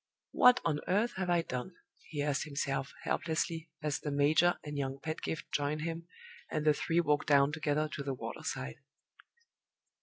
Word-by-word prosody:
"What 250 0 +6
on 155 -3 +1
earth 210 +6 +2
have 190 -1 -1
I 175 -1 +3
done?" 140 +5 -5 0.3
he 145 -2 -2
asked 145 0 0
himself, 140 -2 -2
helplessly, 165 0 -1
as 150 -2 0
the 150 - -4
major 150 +5 +4
and 150 -1 -6
young 135 -1 -2
Pedgift 155 +1 -4
joined 145 +1 0
him, 165 +1 -4 0.4
and 155 -1 -2
the 150 - +6
three 165 +3 +1
walked 150 -3 +2
down 140 -1 +5
together 155 0 0
to 145 - -5
the 135 -1 -2
water - - -6
side. 65 0 -4
150 Hz, 170 wpm, -33 LUFS, 145-165 Hz, 0.4 s, What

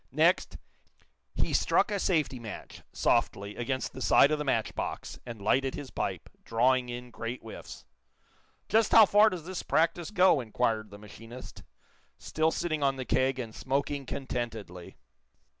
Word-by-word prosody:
Next, - - +2 0.8
he - - -1
struck - - +2
a 200 - 0
safety 155 -9 0
match, 110 -2 -9
softly, 100 +1 0
against 130 +2 -3
the 130 - -8
side 140 - +5
of 155 - 0
the - - -1
match 115 -6 0
box, - - -5
and 115 -2 -7
lighted 130 +6 +1
his 140 - -8
pipe, - - -3 0.2
drawing 125 +2 +2
in 120 0 -7
great 115 +2 -5
whiffs. 115 - -10 0.8
"Just 220 -1 +2
how 225 -1 +10
far 210 +2 +5
does 180 -6 -6
this 185 -1 -4
practice 165 +1 +1
go!" 185 -7 +4
inquired 110 -2 -1
the 100 - -11
machinist, 115 +4 -11 0.6
still 155 +1 0
sitting 155 -2 -2
on 135 -1 +2
the 130 -1 -5
keg 130 +1 +1
and 115 -4 -5
smoking 140 +1 -2
contentedly. 115 -10 -5
130 Hz, 155 wpm, -29 LUFS, 115-155 Hz, 0.8 s, how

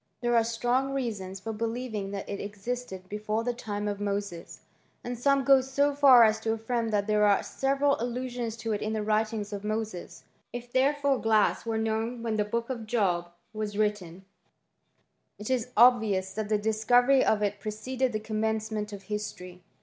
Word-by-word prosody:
There 240 0 +1
are 230 - +5
strong; 245 +4 0
reai^^ 235 -7 -2
s 190 +1 -8
for 225 +3 -5
believing 225 -2 -3
that 200 -1 -5
it 200 - -4
existed 205 -1 -5
before 210 +2 -2
the 245 +1 -1
time 210 -3 -4
of 205 -1 -3 0.2
sea; 175 -4 -9 0.6
and 245 0 -4
some 275 +3 +2
go 270 0 +6
so 280 +2 +1
far 275 -4 +7
as 220 0 +3
to 225 0 -1
affirm 225 +1 -2
that 205 -2 +1
there 210 0 +2
are 205 -1 +5
3ral 275 0 0
allusions 245 -1 -3
to 225 0 -4
it 210 - -1
in 215 +1 -2
the 215 -1 -1
writings 215 -1 -1
of 200 0 -5
Moses. 215 -3 -4 0.3
If 240 0 -8
refore 280 0 +2
glass 220 0 +2
were 225 -1 0
known 225 +2 -2
when 225 -2 -1
the 210 - +2
Book 230 +4 -3
of 230 -4 -5
Job 185 -7 0 0.2
was 215 -1 -4
tten, 200 -4 -2 1.1
it 210 +4 -5
is 250 -3 0
obvious 215 -6 +4
that 215 -1 -4
the 215 - +3
discovery 245 +5 +3
of 210 -1 +2
it 205 0 -1
preoeded 220 +2 -2
commencement 215 -1 -2
of 200 -1 -8
history. 185 -3 -6
220 Hz, 180 wpm, -28 LUFS, 210-245 Hz, 1.1 s, far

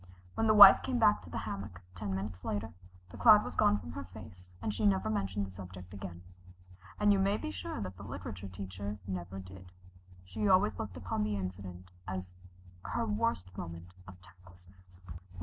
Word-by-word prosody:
When 225 - +1
the 215 - +5
Wife 200 -2 +11
came 260 -2 -1
back 215 -3 +4
to - - -13
the - - -5
hammock, 100 -3 -6
ten 95 0 -4
minutes 95 -1 -5
later, 105 +2 -3 0.4
the - - -10
cloud - - +7
was - - -6
gone 105 - +4
from 80 -5 -8
her 95 +3 -6
face, 90 -1 -13
and 105 - -2
she 105 - -3
never 100 +2 +2
mentioned 100 -1 -1
the 95 - -10
subject 90 0 -10
again. 90 -3 -8 0.8
And 205 0 +5
you 195 - +2
may 195 +2 +2
be 100 - -5
sure 90 -3 -5
that 95 -2 -6
the - - -11
literature 95 +1 -7
teacher 95 +2 -6
never 95 0 -5
did. 95 -1 -11 0.5
She 205 - -2
always 110 - +4
looked 95 -5 -5
upon 90 +4 -3
the 105 0 -1
incident 90 -1 -7 0.2
as 90 -1 -5 0.5
her 235 -1 -2
worst 210 - -1
moment 85 0 -8
of 95 -1 -12
tactlessness. 90 -1 -20
95 Hz, 185 wpm, -32 LUFS, 90-105 Hz, 0.8 s, Wife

